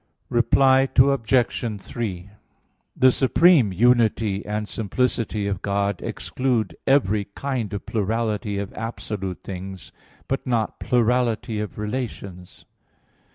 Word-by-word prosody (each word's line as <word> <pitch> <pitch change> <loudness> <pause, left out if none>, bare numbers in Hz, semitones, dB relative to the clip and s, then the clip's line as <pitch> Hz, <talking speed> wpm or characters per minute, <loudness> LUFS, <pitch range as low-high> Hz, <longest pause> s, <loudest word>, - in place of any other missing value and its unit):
Reply 130 +2 +4
Obj. 125 -4 +2
3: 100 -4 -5 0.7
The 130 0 +6
supreme 135 - +4
unity 110 -1 +2
and 105 0 -3
simplicity 110 -2 -1
of 100 -2 -2
God 100 -1 -1
exclude 125 -4 -2
every 110 -7 +3
kind 130 -7 -3
of 100 - -5
plurality 110 -1 -1
of 100 -1 -4
absolute 105 -4 -5
things, 95 -1 -8 0.4
but 135 0 -3
not 115 -4 -1
plurality 120 -2 +1
of 105 -1 -5
relations. 105 -5 -6
110 Hz, 105 wpm, -23 LUFS, 100-125 Hz, 0.7 s, The